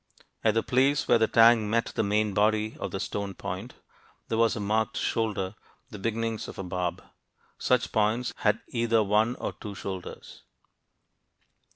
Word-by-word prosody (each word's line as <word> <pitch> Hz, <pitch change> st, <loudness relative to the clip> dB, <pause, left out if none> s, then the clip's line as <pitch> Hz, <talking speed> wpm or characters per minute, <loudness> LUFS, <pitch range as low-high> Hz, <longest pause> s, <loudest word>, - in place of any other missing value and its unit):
At 110 Hz, -1 st, +3 dB
the 115 Hz, -, +2 dB
place 135 Hz, +3 st, +2 dB
where -, -, +5 dB
the 110 Hz, -, +3 dB
tang 115 Hz, -2 st, +5 dB
met 115 Hz, +1 st, 0 dB
the -, -, 0 dB
main 105 Hz, 0 st, +1 dB
body 110 Hz, +1 st, +1 dB
of -, -, -3 dB
the 95 Hz, -, -4 dB
stone 100 Hz, -1 st, -4 dB
point, 100 Hz, +5 st, -6 dB, 0.5 s
there 110 Hz, -, 0 dB
was 115 Hz, -1 st, +3 dB
a -, -, -4 dB
marked 110 Hz, +2 st, 0 dB
"shoulder," 100 Hz, -4 st, -1 dB, 0.4 s
the 105 Hz, -, -8 dB
beginnings 115 Hz, +1 st, -2 dB
of -, -, -9 dB
a 95 Hz, -, -4 dB
barb. 90 Hz, -1 st, -3 dB, 0.6 s
Such 125 Hz, -1 st, +1 dB
points 110 Hz, +3 st, +1 dB
had 105 Hz, +1 st, +1 dB
either 115 Hz, -2 st, +2 dB
one 105 Hz, +4 st, +2 dB
or -, -, -4 dB
two 105 Hz, -3 st, -8 dB
shoulders. 95 Hz, -1 st, -7 dB
110 Hz, 165 wpm, -27 LUFS, 100-115 Hz, 0.6 s, where